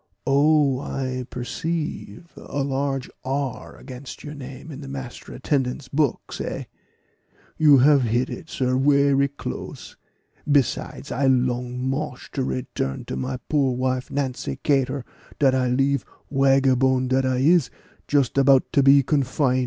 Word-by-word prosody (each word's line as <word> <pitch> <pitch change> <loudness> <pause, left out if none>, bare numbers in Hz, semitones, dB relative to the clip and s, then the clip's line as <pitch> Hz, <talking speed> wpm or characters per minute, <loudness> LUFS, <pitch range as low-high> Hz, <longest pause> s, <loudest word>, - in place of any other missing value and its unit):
"Oh, 140 -1 +3
I 130 -2 -3
perceive 155 +1 -4
a 140 0 -4
large 135 -1 -2 0.2
R 135 0 -3
against 130 0 -10
your 150 - -7
name 140 +2 -9
in 140 0 -8
the 140 - -8
master 135 -2 -8
attendant's 130 0 -2
books, 145 -3 -1
eh?" - - -4 1.0
"You 150 -3 +7
have 140 +2 +5
hit 120 +2 +1
it, 165 - -8
sir, 130 -3 0
werry 140 0 +3
close; 140 +1 -7 0.6
besides, 130 - 0
I 135 +2 +1
long 125 0 0
mosh 135 -1 -4
to - - -2
return 65 0 -3
to - - -5
my 65 - -3
poor 140 -4 +1
wife, 130 0 -1
Nancy 135 -2 -3
Cator, 135 -2 +1 0.3
dat 135 -3 +3
I 130 -1 +1
leave, 135 +2 +1 0.3
wagabone 135 -1 +3
dat 130 +1 +2
I 130 -1 +1
is, 155 +2 +4 0.4
just 140 -2 +2
about 135 -1 +5
to 140 - +5
be 140 +1 +6
confine." 135 -2 +1
135 Hz, 140 wpm, -23 LUFS, 130-140 Hz, 1.0 s, You